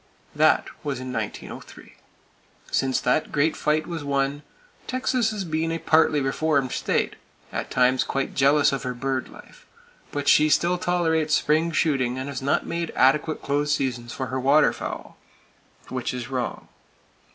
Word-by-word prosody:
That - - +3 0.2
was 140 -3 -3
in 130 0 -6
1903. - - -7 0.8
Since 135 -1 +1
that 125 +5 +1
great 155 +2 +1
fight 155 +1 0
was 165 -3 -5
won, 140 0 -1 0.5
Texas 255 -2 0
has 210 -3 -3
been 160 0 -1
a 165 - -1
partly 160 -2 +3
reformed 135 -1 0
state, - - -1 0.4
at - - -3
times 125 0 +3
quite 135 0 -2
jealous 140 +1 +4
of 135 - -2
her 125 -1 -4
bird 130 +1 -2
life; - - -15 0.5
but 145 -1 -3
still 155 +1 +5 0.3
she 180 - -9
tolerates 160 -3 +1
spring 155 +3 +2
shooting 135 -6 +1
and 130 +2 -4
has 135 -2 -5
not 140 +2 +1
made 170 0 -3
adequate 150 +4 +2
close 145 +1 0
seasons 120 -3 -3
for 130 - -4
her 130 - 0
waterfowl; 140 +4 +1 0.7
which 125 -1 -3
is 125 +1 -5
wrong. 125 -3 -4
145 Hz, 150 wpm, -24 LUFS, 130-155 Hz, 0.8 s, still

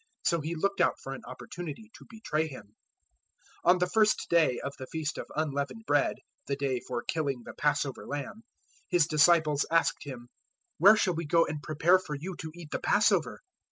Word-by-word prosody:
So 170 -2 +1
he 160 +3 -3
looked 200 +5 0
out - - +2
for 135 - -6
an 135 - -8
opportunity 175 - -8
to - - -15
betray 160 -9 -2
Him. 105 -8 -11 0.9
014:012 - - +4
On 180 - +7
the 180 - +2
first 215 +2 +2
day 160 -7 +4
of 140 - -5
the 130 - -7
feast 155 0 -4
of - - -6
Unleavened 150 +7 -2
Bread - - +2 0.3
the 140 - 0
day 135 -2 -1
for 120 -1 -5
killing 140 -6 -2
the - - -8
Passover 145 -2 -1
lamb 145 +9 -5 0.5
His 175 -4 +4
disciples 155 -2 +4
asked 165 0 +2
Him, 125 -4 -9 0.5
"Where 200 +6 +8
shall 190 -4 +2
we 165 -1 -4
go 165 +2 +4
and 150 -2 -5
prepare 160 +5 +3
for 150 -5 -6
you 175 +6 -6
to 160 - -6
eat 170 -3 -11
the - - -2
Passover?" - - +2
155 Hz, 195 wpm, -29 LUFS, 140-175 Hz, 0.9 s, Where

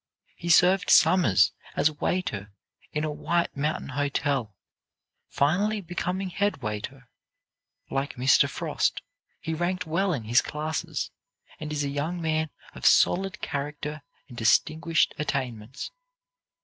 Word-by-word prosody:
He 170 - -6
served 180 +3 +5
summers 100 - +5 0.2
as 155 - +3
waiter 105 - -2 0.4
in 150 - -2
a 155 - -1
White 170 +3 -1
Mountain 150 +1 -2
hotel, 140 -5 -1 0.7
finally 200 +9 +1
becoming 180 +1 -3
head 200 -7 -1
waiter. 110 +5 -5 0.8
Like 135 +1 -2
Mr. 130 +2 +4
Frost, - - -1 0.4
he 160 - -4
ranked 175 +2 -1
well 175 +5 0
in 135 -9 -2
his 115 +3 +4
classes, 155 +1 -3 0.5
and 150 0 -5
is 145 -1 -1
a 140 - -1
young 150 +5 -2
man 160 -1 0 0.2
of - - -11
solid 195 +2 +3
character 150 +1 -4 0.3
and 125 - -12
distinguished 155 +8 +2
attainments. 130 -4 -3
150 Hz, 125 wpm, -26 LUFS, 135-175 Hz, 0.8 s, served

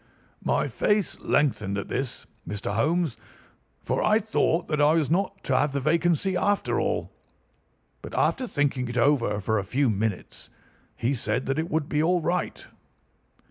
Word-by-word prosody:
"My - - +1
face 210 -2 0
lengthened 105 -9 +1
at 100 - -4
this, 130 -1 -3 0.2
Mr. 105 0 -3
Holmes, 150 +2 +1 0.7
for - - -1
I 215 0 +4
thought 195 -6 0
that 150 -1 0
I 150 +1 +5
was 160 -3 +1
not 195 +2 0
to - - 0
have 145 -1 +2
the 140 - 0
vacancy 170 +5 +1
after 205 +2 +1
all; - - -1 0.9
but - - -8
after 260 -2 +1
thinking 140 - 0
it 120 0 -4
over 120 -5 +2
for 110 +2 0
a - - -3
few 125 +5 +1
minutes 105 -1 -3 0.5
he 125 +2 0
said 130 0 -1
that 135 +3 -1
it 165 +2 -2
would 160 -4 0
be 150 - 0
all 175 +3 +3
right. 175 +2 -2
145 Hz, 165 wpm, -26 LUFS, 120-175 Hz, 0.9 s, I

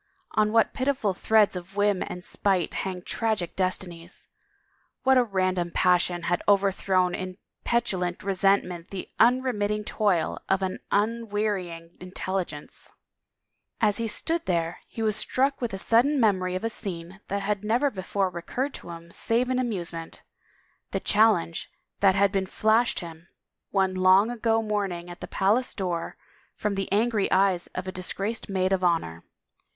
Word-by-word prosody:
On 215 0 +2
what 225 0 +3
pitiful 260 -7 0
threads 215 +1 +3
of 180 +2 -8
whim 205 -2 +2
and 180 - -7
spite 185 -4 0
hang 185 -2 -4
tragic 215 -7 -1
destinies! 180 -2 -3 0.7
What 265 0 +5
a 255 - +5
ran 190 -4 0
dom 175 -1 -2
passion 175 -1 +2
had 175 0 0
overthrown 190 -2 +3
in 185 0 -5 0.3
petulant 185 -7 0
resentment 190 -3 +1
the 195 -2 -7
imremitting 225 -4 +2
toil 200 -6 0
of 195 0 +2
an 185 -1 -2
unwearying 205 -6 -1
intelligence 180 -4 -5 0.9
I 215 - +4
As 205 - 0
he 230 -1 -1
stood 325 +10 -2
there 170 -2 0
he 225 - -5
was 215 -2 +2
struck 270 +4 0
with 240 -3 -1
a 195 - -4
sudden 245 +8 +3
memory 185 -5 +2
of 185 - -3
a 225 - 0
scene 180 -2 -6
that 200 0 -2
had 205 0 -1
never 240 +7 +2
before 190 -1 -1
recurred 250 +11 -3
to - - -9
him 170 0 -9
save 245 +7 +1
in 255 - +1
amusement 175 -9 -3 0.3
— - - -38
the - - +1
challenge 205 -6 +2 0.3
that 195 -2 +5
had 200 0 +3
been 195 -2 0
flashed 220 +4 +2
him, 165 0 -10 0.4
one 190 -2 +1
long 185 +4 +5
ago 225 -1 +1
morning 195 -5 -2
at 175 - -11
the - - -5
palace 215 +6 +1
door, 175 -4 -3 0.4
from 210 - -1
the 195 -1 -3
angry 215 0 +1
eyes 190 -2 +3
of 185 +1 -4
a - - -2
disgraced 195 +5 -3
maid 190 -1 +1
of 185 -1 0
honor. 165 - 0
195 Hz, 160 wpm, -26 LUFS, 180-220 Hz, 0.9 s, What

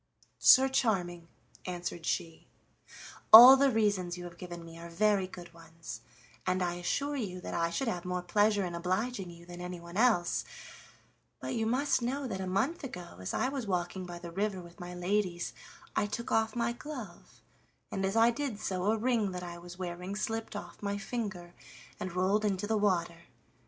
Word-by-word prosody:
"Sir 265 +1 +8
Charming," 180 -10 0 0.4
answered 175 -2 -5
she, 165 -1 -3 0.8
"all 245 +4 +13
the 275 +1 +4
reasons 200 -6 +1
you 175 - -7
have 170 -1 -10
given 175 -2 -8
me 165 0 -11
are 170 0 -9
very 200 +2 +2
good 175 -2 -11
ones, 165 -7 -10 0.5
and 185 0 +1
I 175 -1 0
assure 275 +12 -2
you 195 -9 -4
that - - -6
I 170 0 +1
should 235 +10 -2
have 180 -6 -2
more 180 0 -3
pleasure 205 +2 +2
in 175 - -5
obliging 185 +4 -2
you 170 0 -13
than 175 0 -9
anyone 180 0 -7
else, 215 -7 +3 1.0
but - - -4
you 225 -2 0
must 260 +3 +1
know 270 +4 -2
that 190 -5 -4
a 190 - -3
month 255 - 0
ago 180 - -8
as 95 - -4
I 260 - 0
was 270 -5 -4
walking 180 0 -2
by 175 0 -7
the 170 0 -8
river 195 +1 -1
with 170 +2 -13
my 180 0 -7
ladies 180 -1 -1 0.4
I 205 - +1
took 235 +3 -5
off 225 +1 +1
my 235 0 0
glove, 240 - -9 0.5
and 195 - -2
as 195 +2 0
I 230 +1 +5
did 260 -4 -4
so 185 -2 -2
a 220 +2 +2
ring 230 -3 +1
that 180 0 -5
I 175 -1 -7
was 175 +1 -11
wearing 180 +1 -5
slipped 225 +1 -3
off - - -8
my 200 0 -2
finger 200 -6 -5 0.5
and 180 -1 -5
rolled 190 +4 +2
into 200 -1 0
the 220 +1 0
water. 175 -5 0
185 Hz, 190 wpm, -31 LUFS, 175-225 Hz, 1.0 s, all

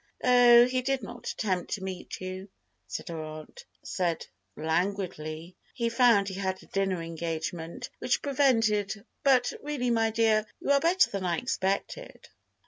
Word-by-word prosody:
"Oh, 245 -1 +7
he 255 +1 0
did 265 -1 -1
not - - -9
attempt 185 -5 -2
to 195 - -4
meet 185 -1 -6
you," 185 +1 -6 0.4
said - - -6
her 165 -2 -4
aunt, 155 - -9 0.2
said 175 -3 -2 0.3
languidly. 165 0 -2 0.2
"He 235 -3 0
found 230 -4 +4
he 195 - -4
had 190 -1 -3
a - - -15
dinner 195 -3 -1
engagement 165 +6 -5
which 250 - 0
prevented, 225 -7 +1 0.2
but 255 -3 +4
really, 280 -5 -1
my 225 -1 +2
dear, 220 -1 +2
you - - -1
are 280 - +5
better 345 +5 +3
than 195 -1 -3
I 175 -2 0
expected." 225 - -3
200 Hz, 150 wpm, -28 LUFS, 180-245 Hz, 0.4 s, Oh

